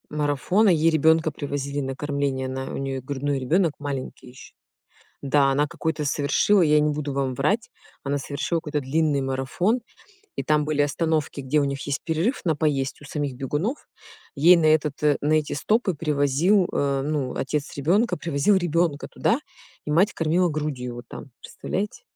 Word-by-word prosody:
Марафона, 150 Hz, +8 st, +1 dB
ей 165 Hz, -2 st, +4 dB
ребёнка 160 Hz, +1 st, +3 dB
привозили 140 Hz, -1 st, -4 dB
на 135 Hz, -1 st, -4 dB
кормление, 140 Hz, -2 st, -2 dB
она 130 Hz, 0 st, -4 dB
у -, -, -4 dB
неё 135 Hz, -1 st, -3 dB
грудной 140 Hz, +1 st, -2 dB
ребёнок 160 Hz, +5 st, +1 dB
маленький 140 Hz, -3 st, -5 dB
ещё. 125 Hz, -, -14 dB, 0.7 s
Да, 140 Hz, 0 st, +3 dB
она 145 Hz, +2 st, +2 dB
какой-то 155 Hz, 0 st, -3 dB
совершила, 150 Hz, +8 st, +2 dB
я 150 Hz, -2 st, +4 dB
не 150 Hz, 0 st, +1 dB
буду 145 Hz, -1 st, -3 dB
вам 135 Hz, -1 st, -1 dB
врать, 200 Hz, -, 0 dB, 0.3 s
она 140 Hz, +1 st, -1 dB
совершила 140 Hz, +5 st, -2 dB
какой-то 150 Hz, -2 st, -3 dB
длинный 145 Hz, +1 st, +1 dB
марафон, 135 Hz, -, 0 dB, 0.6 s
и -, -, -3 dB
там 150 Hz, -1 st, +2 dB
были 150 Hz, -1 st, +1 dB
остановки, 150 Hz, 0 st, -1 dB
где 135 Hz, +3 st, +1 dB
у 145 Hz, -, +1 dB
них 140 Hz, -1 st, -3 dB
есть 140 Hz, 0 st, -2 dB
перерыв 170 Hz, -, -1 dB
на 160 Hz, -3 st, +2 dB
поесть 140 Hz, -2 st, -1 dB
у -, -, -11 dB
самих 145 Hz, -2 st, -3 dB
бегунов. 150 Hz, -, -3 dB, 0.5 s
Ей 165 Hz, +5 st, +7 dB
на 165 Hz, -, +1 dB
этот 155 Hz, -2 st, +2 dB
э, 150 Hz, -2 st, +3 dB
на 150 Hz, +2 st, +1 dB
эти 155 Hz, -1 st, +1 dB
стопы 210 Hz, +5 st, +1 dB
привозил 150 Hz, +5 st, +2 dB
э, 140 Hz, -1 st, 0 dB
ну, 145 Hz, -4 st, -2 dB
отец 145 Hz, +1 st, -3 dB
ребёнка 190 Hz, -, +2 dB
привозил 165 Hz, +5 st, +1 dB
ребёнка 170 Hz, -4 st, 0 dB
туда, 235 Hz, -, 0 dB, 0.5 s
и 150 Hz, -, -3 dB
мать 190 Hz, +8 st, +3 dB
кормила 170 Hz, +3 st, +1 dB
грудью 150 Hz, -5 st, -3 dB
его 120 Hz, 0 st, -8 dB
там. -, -, -9 dB, 0.2 s
Представляете? 205 Hz, +2 st, -4 dB
150 Hz, 170 wpm, -24 LUFS, 140-160 Hz, 0.7 s, Ей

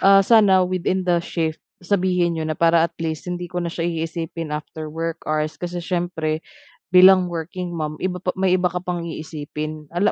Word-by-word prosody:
ah, 195 Hz, 0 st, +6 dB
sana 200 Hz, -5 st, +5 dB
within 185 Hz, +1 st, -1 dB
the 175 Hz, -1 st, +2 dB
shift, 165 Hz, -2 st, -3 dB, 0.2 s
sabihin 180 Hz, -3 st, +1 dB
niyo 160 Hz, -, -2 dB
na 155 Hz, -, -2 dB
para 165 Hz, 0 st, +4 dB
at -, -, -38 dB
least 160 Hz, +1 st, -3 dB
hindi 180 Hz, 0 st, -3 dB
ko 180 Hz, -, -9 dB
na 170 Hz, -, -2 dB
siya 165 Hz, 0 st, -3 dB
iisipin 165 Hz, -1 st, -3 dB
after 155 Hz, +1 st, -5 dB
work 165 Hz, +1 st, -4 dB
hours." 155 Hz, 0 st, -1 dB
Kasi 175 Hz, -1 st, -4 dB
siyempre 170 Hz, -4 st, -1 dB, 0.5 s
bilang 185 Hz, -1 st, +7 dB
working 175 Hz, +2 st, -4 dB
mom, 155 Hz, -2 st, -3 dB
iba 180 Hz, -1 st, -1 dB
pa 180 Hz, 0 st, -2 dB
may 190 Hz, -1 st, +1 dB
iba 180 Hz, 0 st, +3 dB
ka 180 Hz, +1 st, -4 dB
pang 175 Hz, -2 st, -3 dB
iisipin, 155 Hz, -1 st, -6 dB
ala 200 Hz, +4 st, +3 dB
170 Hz, 190 wpm, -22 LUFS, 160-180 Hz, 0.5 s, bilang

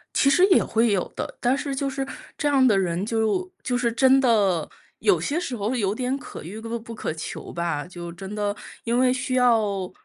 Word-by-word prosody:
其 275 Hz, -, +4 dB
实 355 Hz, +7 st, +5 dB
也 375 Hz, -, +5 dB
会 225 Hz, 0 st, +2 dB
有 190 Hz, -3 st, 0 dB
的， -, -, -5 dB
但 250 Hz, +2 st, +2 dB
是 280 Hz, -1 st, -3 dB
就 275 Hz, +1 st, -1 dB
是 270 Hz, 0 st, -3 dB, 0.3 s
这 295 Hz, -, 0 dB
样 275 Hz, -2 st, +4 dB
的 210 Hz, -5 st, +4 dB
人， 180 Hz, 0 st, 0 dB
就 225 Hz, -, 0 dB
就 245 Hz, -, 0 dB
是 240 Hz, -1 st, +1 dB
真 265 Hz, +3 st, +5 dB
的 205 Hz, -10 st, +2 dB, 0.3 s
有 400 Hz, -3 st, +3 dB
些 310 Hz, +4 st, -1 dB
时 265 Hz, -8 st, -4 dB
候 215 Hz, +4 st, -2 dB
有 200 Hz, -5 st, 0 dB
点 255 Hz, +4 st, -1 dB
可 -, -, -9 dB
遇 190 Hz, +7 st, -7 dB
不 230 Hz, +1 st, -4 dB
不 230 Hz, +1 st, -9 dB
可 185 Hz, -, -3 dB
求 160 Hz, -, -7 dB
吧， 170 Hz, -4 st, -2 dB
就 175 Hz, -1 st, -8 dB
真 190 Hz, +3 st, -8 dB
的 205 Hz, -1 st, -1 dB, 0.3 s
因 235 Hz, +1 st, +1 dB
为 255 Hz, 0 st, +4 dB
需 255 Hz, 0 st, -2 dB
要 215 Hz, -7 st, +2 dB
230 Hz, 235 characters per minute, -24 LUFS, 200-265 Hz, 0.3 s, 实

